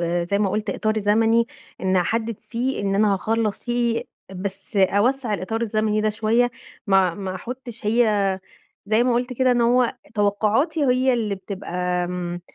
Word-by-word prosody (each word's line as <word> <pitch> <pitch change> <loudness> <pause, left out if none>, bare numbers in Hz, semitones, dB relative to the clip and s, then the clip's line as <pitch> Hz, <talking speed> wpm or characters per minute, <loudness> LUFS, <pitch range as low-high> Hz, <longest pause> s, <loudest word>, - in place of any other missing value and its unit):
آآ، 170 0 0
زي 200 +3 0
ما 205 -2 +1
قُلت 210 0 -1
إطار 215 +2 0
زمني، 225 +3 +3 0.3
إنِّي 185 -1 +2
أحدد 225 +4 -1
فيه 250 +3 -3
إن 195 -1 0
أنا 205 0 +3
هاخلص 220 +1 -1
فيه، 240 -1 0 0.3
بس 195 +2 -6
أوَسّع 215 +5 +2
الإطار 220 +4 -3
الزمني 215 -1 0
ده 215 0 +1
شوية، 225 +3 +2 0.4
ما 190 -3 +3
ما 190 0 -5
أحطش 240 0 -7
هي 210 -4 +2 0.5
زي 220 +3 +3
ما 250 - +2
قُلت 245 +1 -1
كده، 255 +1 +2
إن 240 - +1
هو 245 +1 +3 0.2
توقعاتي 220 - +1
هي 255 0 +3
اللي 215 -4 -1
بتبقى 195 0 -8 0.3
امم، 175 0 -4
215 Hz, 165 wpm, -23 LUFS, 195-235 Hz, 0.5 s, زمني